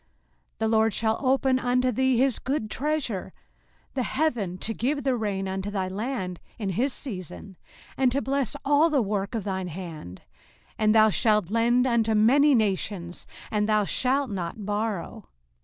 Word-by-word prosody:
05:028:012 - - -45
The 220 - 0
LORD 220 -1 +3
shall 220 -1 0
open 265 0 +3
unto 250 0 +1
thee 260 +1 +2
his 260 -1 +2
good 260 -6 -2
treasure, 280 -8 -2 0.6
the 265 - -1
heaven 240 - -1
to 225 +5 -3
give 280 +6 -1
the 265 -1 +1
rain 200 -4 -2
unto 190 +1 -3
thy 195 -2 -2
land 190 -2 -4 0.2
in 205 -5 -3
his 245 +10 0
season, 195 - -8 0.4
and 260 -2 +3
to 270 - +1
bless 275 -3 -1
all 290 +3 +4
the 285 -6 +2
work 200 +1 -2
of 220 - -2
thine 190 -2 -3
hand: 160 - -8 0.5
and 215 0 +2
thou 220 0 +6
shalt 210 -3 +2
lend 240 +2 +3
unto 230 -3 +2
many 270 +7 +5
nations, 195 -5 -2 0.2
and 210 0 0
thou 215 -1 +3
shalt 260 +3 +1
not 190 +2 -4
borrow. 210 -2 -3
220 Hz, 165 wpm, -26 LUFS, 195-260 Hz, 0.6 s, thou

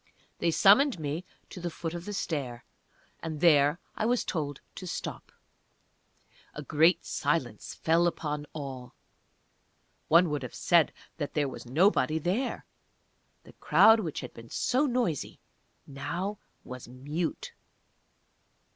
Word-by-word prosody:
They 170 - +2
summoned 210 - +5
me 155 +4 -3 0.3
to - - -8
the 175 0 -3
foot 165 0 -5
of 175 0 -6
the 205 - -5
stair, 140 -11 -3 0.5
and 160 -2 -5
there 150 -2 +5 0.2
I 220 - 0
was 245 0 +2
told 145 -5 -3
to 185 - -8
stop. - - -6 1.2
A 150 - -6
great 160 +5 +3
silence 120 -10 -2
fell 165 +2 +3
upon 150 -3 -3
all. 130 -4 -7 1.1
One 170 0 +5
would 150 -2 -1
have 125 - -7
said 170 -3 +3 0.3
that 145 -3 -4
there 145 -2 +2
was 130 - -8
nobody 155 - +3
there. 185 - -1 0.8
The - - -16
crowd 225 0 +6
which 165 -8 -3
had 125 - -8
been 115 0 -12
so 270 +4 +1
noisy 240 - -1 0.5
now 175 +9 -4 0.2
was 125 -2 -9
mute. 160 - -4
160 Hz, 130 wpm, -29 LUFS, 145-180 Hz, 1.2 s, crowd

